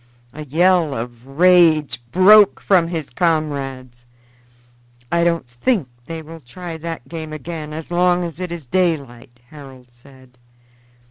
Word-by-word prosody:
A 155 +1 -8
yell 165 0 +2
of 120 +2 -8
rage 160 -3 +3
broke 205 +2 +6
from 180 -4 +2
his 165 -4 -5
comrades. 135 -6 -2 1.0
"I 170 0 +2
don't 170 -5 0
think 135 - -1 0.2
they 165 -1 -6
will 165 +1 -11
try 165 +6 -8
that 165 -4 -7
game 160 -2 -7
again 155 0 -7
as 160 +2 -8
long 180 0 +2
as 170 -1 -7
it 180 -2 -5
is 170 -4 -7
daylight," 135 -7 -2
Harold 135 -4 -13
said. 130 0 -20
155 Hz, 135 wpm, -19 LUFS, 130-170 Hz, 1.0 s, broke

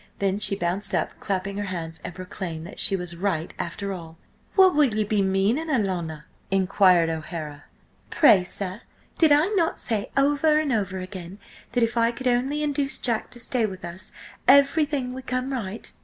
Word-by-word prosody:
Then 195 0 0
she 200 - +3
bounced 190 +2 -1
up, - - -2
clapping 195 0 -3
her 205 - -2
hands, 165 -4 -5
and 175 - -7
proclaimed 180 -3 -6
that - - -7
she 195 - +4
was 180 -2 -4
right 170 -3 -2
after 200 +4 -4
all! 165 -3 -9 0.4
"What 380 -2 +6
will 290 -4 +3
ye 215 - +1
be 210 0 0
meaning, 195 +11 +1
alanna?" 180 - -1 0.3
inquired 185 -2 +4
O'Hara. 155 -2 -6 0.4
"Pray, 215 - +6
sir, 185 +2 -2 0.4
did 320 -3 +5
I 300 +6 +5
not 355 -6 +1
say 215 -4 -1
over 290 +2 +3
and 295 -4 0
over 200 -4 -1
again 185 0 -7 0.4
that 245 -1 +2
if 230 +1 -1
I 230 0 +3
could 260 +2 -9
only 265 +5 +1
induce 280 -2 0
Jack 235 -3 -2
to 240 - -9
stay 235 -2 +1
with 185 -3 -8
us 175 +2 -8 0.4
everything 280 -2 +4
would 260 0 -9
come 255 +2 -2
right? 220 -3 -2
200 Hz, 180 wpm, -24 LUFS, 185-260 Hz, 0.4 s, What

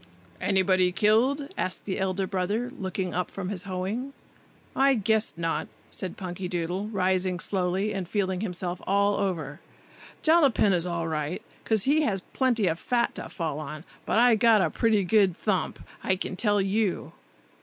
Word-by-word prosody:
"Anybody 185 -2 +3
killed?" 245 +9 +2
asked 185 - -3
the 190 - -3
elder 190 0 0
brother, 205 +6 -2
looking 190 -3 -3
up 180 +1 -1
from 185 -2 -5
his 200 -1 -5
hoeing. 205 +9 -3 0.6
"I—guess—not!" 215 - +1 0.2
said 185 -2 -6
Punkydoodle, 180 +1 -3
rising 185 -2 +1
slowly 190 +3 -1
and 190 -3 -4
feeling 190 -2 -1
himself 180 -3 -3
all 200 +1 +3
over. 160 -8 -2 0.6
"Jollapin 285 - +4
is 175 0 +1
all 170 -1 -2
right, 155 +1 -3 0.2
'cause 220 -3 +2
he 295 +3 +3
has 200 -10 0
plenty 240 -3 0
of 165 -1 0
fat 240 -1 0
to - - -7
fall 160 -4 -3
on, 155 0 -7 0.2
but - - +1
I 240 +1 +6
got 220 -2 +5
a - - 0
pretty 220 -3 +2
good 190 -2 +3
thump, 200 -4 -1 0.3
I 190 - +2
can 185 - -4
tell 205 +1 +2
you." 195 0 0
190 Hz, 155 wpm, -27 LUFS, 180-215 Hz, 0.6 s, I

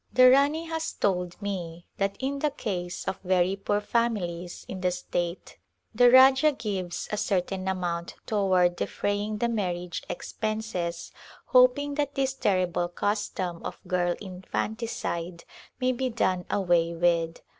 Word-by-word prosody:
The 255 0 +7
Rani 285 +5 +3
has 325 -1 -3
told 180 -3 -1
me 175 -4 -4
that 195 0 0
in 275 +1 -2
the 300 - +1
case 180 -10 -4
of 190 - -2
very 185 0 +2
poor 205 +1 0
families 190 -7 -2
in 185 - -6
the 180 - +2
state 175 0 -4 0.3
the 245 +2 +6
Rajah 265 +4 +7
gives 195 -7 -4
a 210 - -1
certain 190 -1 -1
amount 175 -2 -2
toward 185 -4 +2
defraying 205 +1 -2
the 235 - +1
marriage 180 -6 -2
expenses 215 -5 -3 0.3
hoping 255 +3 +4
that 285 -1 -3
this 270 -1 +1
terrible 185 -7 +1
custom 185 -2 -2
of - - -6
girl 175 -1 +1
infanticide 185 -2 -4 0.4
may 255 0 +2
be 255 +1 -1
done 185 -6 0
away 175 -3 +2
with. 165 -1 +1
195 Hz, 135 wpm, -27 LUFS, 175-235 Hz, 0.4 s, The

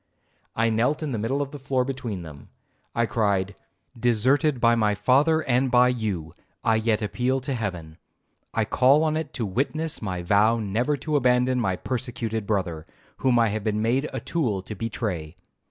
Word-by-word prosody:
I 115 0 +2
knelt 125 +8 +1
in 150 - -3
the 115 - -2
middle 135 +7 0
of 140 - -9
the 145 - -8
floor 130 -1 0
between 125 -9 -4
them. 75 -3 -12 0.5
I 120 - +2
cried, 100 -4 0 0.4
'Deserted 125 +5 +2
by 115 0 +4
my 105 -3 +2
father 150 +8 +3
and 130 -1 +1
by 125 0 +5
you, 100 -10 -3 0.3
I 110 -1 +3
yet 110 -1 0
appeal 125 +5 0
to 135 +2 -3
Heaven. 90 -9 -5 0.5
I - - 0
call 135 +5 +4
on 155 -1 +1
it 155 -2 -3
to 120 - -2
witness 140 +10 -2
my 90 -4 -3
vow 105 +5 +3
never 115 +7 0
to 150 +3 -2
abandon 125 -1 +2
my 95 -6 0
persecuted 115 -3 -4
brother, 90 -7 -2 0.3
whom 130 -2 +2
I 115 -1 +4
have 105 0 -3
been 105 0 0
made 130 +6 +1
a - - -3
tool 115 - -1
to 105 - -7
betray. 100 -7 -4
115 Hz, 180 wpm, -25 LUFS, 105-130 Hz, 0.5 s, by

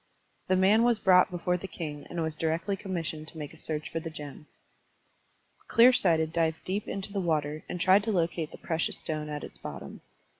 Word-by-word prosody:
The 185 - +3
man 195 +4 +5
was 240 -1 +4
brought 185 -3 +5
before 180 0 -1
the 195 - -7
king 150 -5 -6
and 170 -1 -2
was 160 -1 -2
directly 165 +5 -1
commissioned 170 -6 -4
to 160 - -10
make 150 -2 -6
a - - -15
search 155 -1 -3
for 165 - -3
the 165 0 -6
gem. 150 -1 -9 1.2
Clear 245 +2 +7
Sighted 160 -7 +2
dived 160 -1 0
deep 200 +3 -3
into 195 +1 -4
the 200 - -1
water 155 -3 -1
and 180 - -4
tried 190 +3 +5
to 225 - 0
locate 170 -4 0
the - - -10
precious 160 -1 -1
stone 155 -1 -4
at 150 0 -5
its - - -8
bottom. - - -8
165 Hz, 200 wpm, -29 LUFS, 155-190 Hz, 1.2 s, Clear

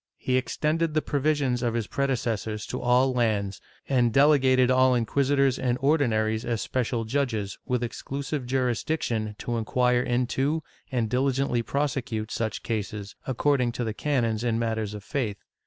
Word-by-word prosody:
He 130 - -1
extended 155 +4 0
the 155 - +3
provisions 145 -4 0
of 120 -2 0
his 115 -2 0
prede 140 +5 -1
cessors 110 -2 -3
to - - -3
all 125 +2 +3
lands, 105 -5 0 0.3
and 125 -3 +3
delegated 130 -2 +5
all 130 0 +5
inc{uisitors 135 +2 +2
and 125 -1 +1
Ordinaries 115 -6 +2
as 115 -2 -1
special 120 -2 -1
judges, 110 -5 -1
with 125 -1 0
exclusive 135 +2 -4
jurisdiction 120 -3 -1
to 120 +1 -3
inquire 125 +2 +2
into 130 +5 0 0.3
and 120 -4 0
diligently 130 0 +1
prosecute 125 -5 -2
such 110 -1 -2
cases, 105 -2 -4
according 130 -2 +1
to 120 - -2
the 110 -2 -2
canons 115 -5 0
in 115 -2 +1
matters 110 -2 -2
of 105 - -8
faith. 115 -6 -2
125 Hz, 150 wpm, -26 LUFS, 115-135 Hz, 0.3 s, delegated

